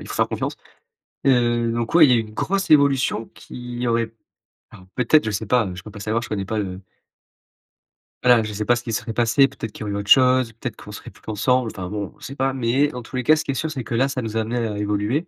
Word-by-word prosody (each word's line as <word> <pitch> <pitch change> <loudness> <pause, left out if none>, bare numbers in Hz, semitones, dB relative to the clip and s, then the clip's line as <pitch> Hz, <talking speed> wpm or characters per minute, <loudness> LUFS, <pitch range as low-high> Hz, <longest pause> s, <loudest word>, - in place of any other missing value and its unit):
il - - -10
faut - - -5
faire - - +1
confiance - - -3 0.7
et 135 - +5
heu, 120 -2 +2
donc, 120 +6 -3
ouais, 160 -3 +8
il - - +2
y - - +6
a - - +4
une 110 -1 -9
grosse 195 - -1
évolution 140 -6 +3
qui 125 0 -6
aurait, 115 -1 0 0.6
alors, 95 - -15
peut-être 125 +3 +4
je 110 - 0
sais 105 +2 -3
pas, 120 -2 +2
heu, 90 - -5
je 90 - -8
peux 110 - -10
pas 105 - -10
savoir, 110 +3 -1
je - - -7
connais 100 -2 -2
pas 110 +1 -2
le 95 -2 -4 1.4
voilà, 125 -2 +6
je 105 - -5
sais 105 +1 -3
pas 120 +2 +3
ce 120 - -7
qu'il 115 - -4
se - - +1
serait 115 - -6
passé, 120 +5 +3
peut-être 110 -2 -7
qu'il - - -12
y - - -2
aurait 105 - -4
eu - - -2
autre 100 0 -5
chose, 130 -3 +5
peut-être 115 - -6
qu'on - - -10
serait - - -9
plus - - -22
ensemble, 125 +2 +1
enfin 90 -2 -5
bon, 105 +3 -5
on 150 - -27
sait 140 -1 -8
pas, 135 0 0
mais 130 +3 +2
dans 125 -4 -6
tous 130 +2 -7
les 125 - -1
cas, 155 +5 +5
ce 155 - -2
qui - - -2
est - - -2
sûr, 160 +4 -2
c'est 135 -5 -5
que 115 - -4
là, 135 +3 +3
ça 135 -2 -3
nous 115 -1 -4
a - - +2
amenés 115 +1 -2
à 105 -2 -4
évoluer, 105 - -1
120 Hz, 290 wpm, -22 LUFS, 110-130 Hz, 1.4 s, ouais